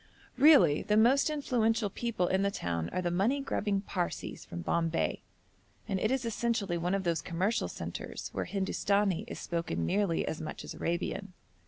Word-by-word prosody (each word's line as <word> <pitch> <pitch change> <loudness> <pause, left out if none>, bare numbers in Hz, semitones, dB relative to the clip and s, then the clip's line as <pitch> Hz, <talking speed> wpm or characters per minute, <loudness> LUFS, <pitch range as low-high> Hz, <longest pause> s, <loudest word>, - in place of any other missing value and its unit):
Really 275 - +6
the 210 - +1
most 260 +7 +5
influential 230 -7 +1
people 230 -6 -1
in 190 +2 +1
the 200 - +2
town 85 - -3
are 185 - -2
the 175 - 0
money 210 +11 +2
grubbing 205 -7 -1
Parsees 180 -3 -4
from 85 - -7
Bombay, 165 - 0 0.7
and 195 -3 -1
it 215 - +1
is 260 -1 0
essentially 230 -5 0
one 180 +3 0
of 195 - -1
those 170 -4 0
commercial 185 +8 0
centres - - -6
where - - -2
Hindustani 195 -1 0
is - - -6
spoken 165 - -2
nearly 195 - +1
as 160 - -3
much 155 - -6
as - - -7
Arabian. 185 +3 -3
195 Hz, 170 wpm, -31 LUFS, 170-225 Hz, 0.7 s, Really